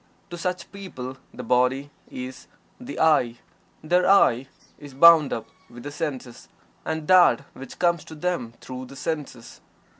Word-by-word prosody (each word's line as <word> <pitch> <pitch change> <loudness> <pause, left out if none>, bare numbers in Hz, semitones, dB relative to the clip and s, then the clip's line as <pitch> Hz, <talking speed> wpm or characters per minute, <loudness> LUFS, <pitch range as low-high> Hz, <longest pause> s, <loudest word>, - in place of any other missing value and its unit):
To 175 - -6
such 180 0 -4
people 135 -10 -8
the 125 - -8
body 125 +4 +1 0.2
is 130 +1 -8 0.3
the 250 +2 -8
"I." 145 -7 +3 0.5
Their 180 +4 +2
"I" 135 -10 +4 0.3
is 145 -2 -12
bound 160 -1 +7
up 115 - -3 0.2
with 120 0 -12
the 145 - -6
senses, 135 -5 -6 0.3
and 160 -1 -4
that 180 -6 +6
which 135 -1 -11
comes 170 -2 +1
to 160 - -10
them 150 -8 -3
through 130 0 -7
the 135 - -12
senses. 140 -6 -6
145 Hz, 150 wpm, -24 LUFS, 125-170 Hz, 0.5 s, bound